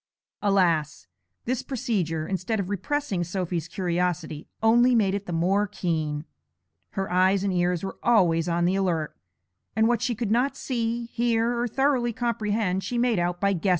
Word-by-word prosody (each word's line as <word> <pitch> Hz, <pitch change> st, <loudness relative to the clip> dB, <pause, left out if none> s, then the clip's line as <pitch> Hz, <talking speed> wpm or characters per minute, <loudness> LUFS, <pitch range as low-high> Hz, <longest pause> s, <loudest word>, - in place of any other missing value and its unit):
Alas! 175 Hz, -7 st, +1 dB, 0.4 s
this 255 Hz, +1 st, -1 dB
procedure, 185 Hz, -, -2 dB
instead 195 Hz, +3 st, -2 dB
of 195 Hz, 0 st, -3 dB
repressing 205 Hz, -1 st, -1 dB
Sophy's 175 Hz, -2 st, -3 dB
curiosity, 175 Hz, -3 st, -2 dB, 0.2 s
only 240 Hz, +3 st, +5 dB
made 200 Hz, -4 st, +3 dB
it 200 Hz, 0 st, -3 dB
the -, -, -4 dB
more 190 Hz, +5 st, +1 dB
keen; 160 Hz, -6 st, -2 dB, 0.7 s
her 195 Hz, -1 st, -3 dB
eyes 185 Hz, +2 st, +3 dB
and 195 Hz, -2 st, 0 dB
ears 180 Hz, -1 st, +1 dB
were 195 Hz, -, -5 dB
always 175 Hz, -8 st, +3 dB
on 170 Hz, 0 st, +1 dB
the 180 Hz, -, +2 dB
alert, 175 Hz, -6 st, -1 dB, 0.6 s
and 220 Hz, +1 st, +4 dB
what 240 Hz, -1 st, +1 dB
she 240 Hz, -1 st, 0 dB
could 220 Hz, -1 st, -2 dB
not 250 Hz, +5 st, +1 dB
see, 235 Hz, -2 st, -2 dB
hear, 235 Hz, 0 st, 0 dB
or 240 Hz, +1 st, 0 dB
thoroughly 260 Hz, -1 st, +1 dB
comprehend 210 Hz, -5 st, -1 dB
she 245 Hz, -, -3 dB
made 235 Hz, -4 st, +2 dB
out 175 Hz, 0 st, -1 dB
by 200 Hz, 0 st, +2 dB
guesses. 190 Hz, +2 st, -1 dB
195 Hz, 165 wpm, -26 LUFS, 175-235 Hz, 0.7 s, only